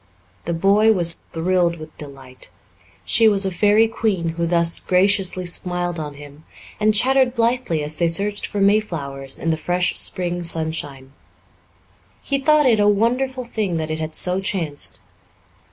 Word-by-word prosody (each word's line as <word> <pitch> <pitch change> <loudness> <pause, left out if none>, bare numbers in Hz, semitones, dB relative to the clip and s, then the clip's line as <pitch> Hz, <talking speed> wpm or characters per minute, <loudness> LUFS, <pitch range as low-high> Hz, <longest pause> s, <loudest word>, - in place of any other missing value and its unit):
The 170 - -2
boy 200 +6 +3
was 170 -4 +2
thrilled 170 +1 -1
with 155 -1 -11
delight. 135 -6 -10 0.6
She 225 0 +3
was 200 -1 +2
a 190 - -1
fairy 210 +4 +3
queen 205 -7 -1
who 170 +1 -2
thus 170 0 +2
graciously 185 -1 +1
smiled 175 -1 -3
on 150 -2 -6
him 145 +1 -13 0.4
and 215 0 +3
chattered 260 +2 +3
blithely 230 -9 0
as 150 +1 -5
they 170 - +2
searched 200 +5 -2
for 205 - -4
mayflowers 165 -10 0
in 165 - -1
the 160 - -1
fresh 180 +2 -1
spring 175 -1 -2
sunshine. 160 -5 -2 1.1
He 275 0 -1
thought 305 +1 +3
it 230 -4 +3
a 205 - +3
wonderful 250 +5 0
thing 210 -7 -2
that 155 -1 -3
it 155 - -3
had 155 0 -5
so 180 +1 +2
chanced. 165 -7 -3
180 Hz, 155 wpm, -20 LUFS, 160-210 Hz, 1.1 s, boy